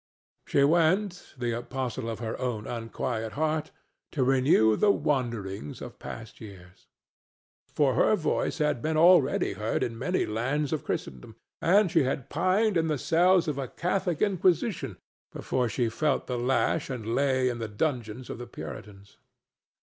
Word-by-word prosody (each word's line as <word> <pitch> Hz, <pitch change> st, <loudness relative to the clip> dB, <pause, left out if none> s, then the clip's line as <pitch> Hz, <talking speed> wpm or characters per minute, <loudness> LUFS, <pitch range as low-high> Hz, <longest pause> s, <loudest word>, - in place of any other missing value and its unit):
She 140 Hz, -, +3 dB
went, 175 Hz, +5 st, +1 dB
the 120 Hz, -1 st, -1 dB
apostle 120 Hz, 0 st, -4 dB
of 115 Hz, -, -4 dB
her 110 Hz, 0 st, -4 dB
own 120 Hz, -4 st, -2 dB
unquiet 115 Hz, -1 st, -4 dB
heart, 155 Hz, 0 st, -1 dB, 0.4 s
to 135 Hz, -, +1 dB
renew 130 Hz, -4 st, +4 dB
the 210 Hz, -, +3 dB
wanderings 115 Hz, -, -1 dB
of -, -, -9 dB
past 115 Hz, -2 st, -9 dB
years. 95 Hz, -4 st, -13 dB, 0.9 s
For 140 Hz, -3 st, +3 dB
her 215 Hz, -, +4 dB
voice 165 Hz, -3 st, -1 dB
had 150 Hz, -6 st, 0 dB
been 155 Hz, +3 st, 0 dB
already 170 Hz, -, +5 dB
heard 105 Hz, +3 st, -1 dB
in 115 Hz, -1 st, -4 dB
many 180 Hz, +9 st, 0 dB
lands 135 Hz, +8 st, -1 dB
of 155 Hz, -, -2 dB
Christendom, 65 Hz, -2 st, -5 dB, 0.3 s
and 190 Hz, +1 st, +4 dB
she -, -, +4 dB
had 135 Hz, 0 st, -2 dB
pined 185 Hz, +5 st, +2 dB
in 165 Hz, 0 st, +1 dB
the 155 Hz, -2 st, 0 dB
cells 175 Hz, +5 st, +3 dB
of 145 Hz, -2 st, -2 dB
a 135 Hz, -, -3 dB
Catholic 180 Hz, 0 st, -1 dB
Inquisition 190 Hz, +1 st, +1 dB, 0.3 s
before 125 Hz, -2 st, -1 dB
she 120 Hz, +3 st, 0 dB
felt 140 Hz, +5 st, 0 dB
the 125 Hz, -, -3 dB
lash 135 Hz, +5 st, +1 dB
and 115 Hz, -3 st, -4 dB
lay 130 Hz, -1 st, +2 dB
in 120 Hz, -1 st, -2 dB
the 115 Hz, -, -3 dB
dungeons 120 Hz, 0 st, -3 dB
of -, -, -7 dB
the 120 Hz, -, -7 dB
Puritans. 100 Hz, -1 st, -10 dB
130 Hz, 155 wpm, -27 LUFS, 115-160 Hz, 0.9 s, already